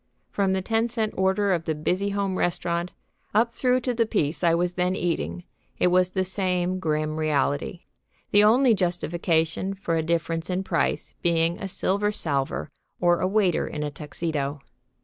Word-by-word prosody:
From 195 -2 +1
the 190 -1 -1
ten 225 +3 +1
cent 225 -2 -2
order 190 +1 +2
of 165 -2 -2
the 160 - -1
Busy 185 +6 0
Home 200 -1 -1
Restaurant, 170 -1 -1 0.5
up 230 +2 +4
through 250 +1 +1
to 250 0 -1
the 230 -1 +1
piece 165 -6 0
I 165 -1 +4
was 175 +1 0
then 180 +1 0
eating, 85 - -2 0.3
it 180 - +3
was 180 0 +4
the 190 0 0
same 185 -1 -1
grim 155 -2 -1
reality, 155 +3 0 0.5
the 205 0 +6
only 240 +3 +5
justification 175 -1 0
for 180 -4 -2
a 160 - +1
difference 165 +1 -1
in 185 +1 -1
price 170 -3 -1
being 170 0 +1
a 195 - -4
silver 200 +2 0
salver 140 - -2 0.3
or 175 -1 +3
a - - +2
waiter 190 -3 +2
in 150 - -4
a 150 - -3
tuxedo. 150 -1 -4
180 Hz, 170 wpm, -25 LUFS, 165-195 Hz, 0.5 s, the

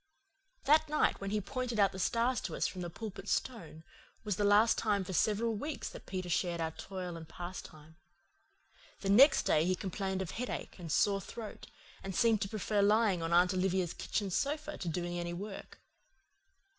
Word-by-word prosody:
That 300 +2 +4
night 300 -7 +1
when 195 - -3
he 210 +1 0
pointed 245 +2 -3
out 200 -1 +5
the 190 - -8
stars 235 +6 +1
to - - -4
us - - 0
from 185 - -3
the 175 - -4
Pulpit 200 +1 -7
Stone 165 -10 -3 0.4
was 210 -3 -1
the 205 - -1
last 205 +3 +5
time 205 -3 +1
for 185 - -6
several 220 +4 +2
weeks 285 +8 -4
that - - -12
Peter 185 -1 -4
shared 175 0 0
our 160 -1 -1
toil 180 0 -6
and 160 -1 -9
pastime. 160 -3 -9 1.0
The 195 - 0
next 270 +8 +7
day 155 - +3
he 185 +2 +1
complained 190 +1 -3
of 175 - -7
headache 250 -4 -5
and 165 -3 -6
sore 195 +4 +3
throat, 220 +3 -8 0.3
and 195 -1 -5
seemed 225 -3 +3
to 195 - -1
prefer 210 -1 0
lying 205 -3 +3
on 165 0 -2
Aunt 180 +2 +5
Olivia's 185 -2 0
kitchen 200 -3 -2
sofa 300 - -1
to 175 - -3
doing 175 +1 -2
any 175 0 -3
work. 195 +3 -7
195 Hz, 185 wpm, -33 LUFS, 175-220 Hz, 1.0 s, next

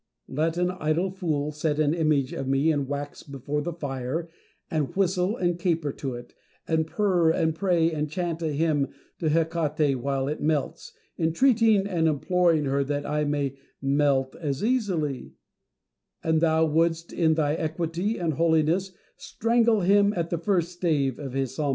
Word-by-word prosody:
Let 160 +5 -1
an 180 0 +1
idle 175 +1 -1
fool 155 -6 -2
set 150 0 -1
an 150 0 +3
image 155 -5 +1
of 135 - -4
me 135 +4 +2
in 145 -3 -1
wax 145 +1 -5
before 140 +2 -4
the 175 - -3
fire, 145 +1 -4 0.4
and 150 -4 -1
whistle 190 +2 +1
and 175 -1 0
caper 165 -5 0
to 135 -2 -5
it, 120 0 -10 0.3
and 160 -1 +1
purr 180 -2 +2
and 160 0 +1
pray, 170 -1 +2
and 150 -1 -2
chant 170 +1 -3
a 165 - -1
hymn 145 -2 +1 0.3
to 160 - 0
Hecate 155 -3 +1
while 135 0 -1
it 150 - -3
melts, 155 - -2 0.3
entreating 215 +4 +3
and 170 -5 +1
imploring 165 +1 +2
her 140 +1 +1
that 145 +1 -3
I 150 0 0
may 140 -2 -2 0.2
melt 135 -1 +1
as 145 -2 -3
easily, 185 - -1 0.4
— - - -53
and 160 -1 +2
thou 160 -1 +3
wouldst, 165 +1 0
in 160 -2 +2
thy 150 -2 +1
equity 170 +6 -2
and 165 -3 -1
holiness, 165 +4 +1 0.2
strangle 230 -1 +1
him 200 +2 +4
at 170 -2 -2
the 170 - -1
first 175 -1 0
stave 155 -7 0
of 135 -4 -6
his 135 -2 -2
psalmody. 150 -2 -1
160 Hz, 170 wpm, -26 LUFS, 145-175 Hz, 0.4 s, him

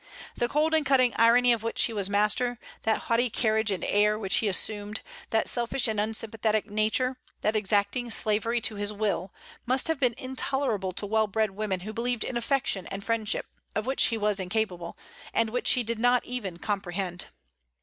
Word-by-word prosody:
That 240 - 0
cold 310 +4 +1
and 315 -1 +3
cutting 255 -3 +3
irony 240 +2 +5
of 230 - -2
which 230 +1 +1
he 230 - +1
was 200 -2 -2
master, 210 +4 +1 0.2
that 220 -1 +1
haughty 240 +2 +1
carriage 220 -1 +1
and 190 -4 -2
air 210 +1 +3
which 195 -3 0
he 220 - +1
assumed, 205 +2 0 0.3
that 220 - +1
selfish 240 +1 +1
and 215 -2 -1
unsympathetic 215 0 -1
nature, 220 +5 0 0.2
that 215 +1 +1
exacting 210 +4 +1
slavery 225 +1 +2
to 220 - 0
his 205 0 -1
will, 200 -3 -2 0.4
must 255 +4 +2
have 320 -3 0
been 250 -4 +2
intolerable 260 -6 -1
to 205 - -3
well 220 +1 +2
bred 215 0 0
women 195 -2 -3
who 215 +4 -6
believed 240 0 -1
in 255 - -4
affection 240 -5 0
and 195 +1 -6
friendship, 225 -2 0 0.3
of 215 +1 -1
which 265 +1 +2
he 225 0 0
was 210 -2 +1
incapable, 180 -3 -2 0.4
and 230 -1 +2
which 245 - +3
he 250 - +1
did 230 0 -2
not 245 +1 +3
even 210 -9 -4
comprehend. 185 -2 -3
220 Hz, 185 wpm, -27 LUFS, 205-240 Hz, 0.4 s, irony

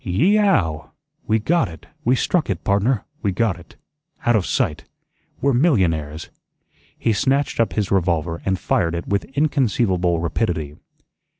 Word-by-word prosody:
"Yee 160 - +2
e - - +3
ow! 95 - +1 0.4
We 110 - +3
GOT 160 - +1
it, 80 -2 -12 0.2
we 125 +3 +3
struck 165 +5 0
it. 95 -4 -2
Pardner, 100 +3 +1 0.2
we 100 - 0
got 95 -2 0
it. 85 - -17 0.5
Out 120 - +4
of 100 -4 +1
sight. 115 - -1 0.6
We're 140 0 +2
millionaires." 85 - +1 0.7
He 115 - +1
snatched 135 +6 0
up 115 - +2
his 105 -3 -1
revolver 85 -3 0
and 95 -1 0
fired 85 -2 0
it 85 - -5
with 100 0 0
inconceivable 105 - +1
rapidity. 80 -3 -2
100 Hz, 155 wpm, -21 LUFS, 85-125 Hz, 0.7 s, Out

